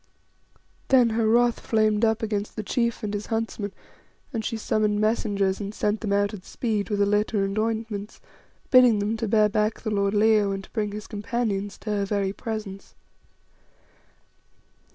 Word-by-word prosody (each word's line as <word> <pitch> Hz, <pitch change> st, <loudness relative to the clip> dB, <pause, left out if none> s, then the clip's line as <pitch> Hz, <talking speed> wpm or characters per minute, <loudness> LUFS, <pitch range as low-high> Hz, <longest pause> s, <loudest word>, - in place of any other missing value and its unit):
Then 250 Hz, -4 st, +5 dB
her 225 Hz, 0 st, +1 dB
wrath 240 Hz, +1 st, +3 dB
flamed 215 Hz, -1 st, +1 dB
up 225 Hz, 0 st, +2 dB
against 210 Hz, -1 st, -2 dB
the 215 Hz, -, -4 dB
chief 235 Hz, +2 st, -1 dB
and 210 Hz, -1 st, -3 dB
his 205 Hz, 0 st, -4 dB
huntsmen, 225 Hz, -3 st, -3 dB, 0.6 s
and 225 Hz, -2 st, -2 dB
she 225 Hz, -, -2 dB
summoned 210 Hz, -1 st, 0 dB
messengers 205 Hz, -3 st, +1 dB
and 205 Hz, 0 st, -5 dB
sent 210 Hz, +1 st, 0 dB
them 210 Hz, -3 st, -2 dB
out 200 Hz, +1 st, +1 dB
at 195 Hz, -3 st, -8 dB
speed 215 Hz, -2 st, -2 dB
with 205 Hz, -1 st, -1 dB
a -, -, +3 dB
litter 210 Hz, 0 st, +1 dB
and 195 Hz, 0 st, -2 dB
ointments, 220 Hz, -2 st, -3 dB, 0.5 s
bidding 250 Hz, -4 st, +7 dB
them 205 Hz, +2 st, -1 dB
to 225 Hz, -, -2 dB
bear 215 Hz, 0 st, +4 dB
back 210 Hz, +1 st, 0 dB
the 220 Hz, -, -3 dB
lord 200 Hz, 0 st, +1 dB
Leo 210 Hz, -1 st, +4 dB
and 195 Hz, 0 st, -5 dB
to -, -, -16 dB
bring 210 Hz, -3 st, -2 dB
his 210 Hz, +1 st, -6 dB
companions 210 Hz, -2 st, -3 dB
to 215 Hz, -, -5 dB
her 200 Hz, -1 st, 0 dB
very 195 Hz, -1 st, -1 dB
presence. 215 Hz, -4 st, -6 dB
215 Hz, 175 wpm, -25 LUFS, 205-225 Hz, 0.6 s, bidding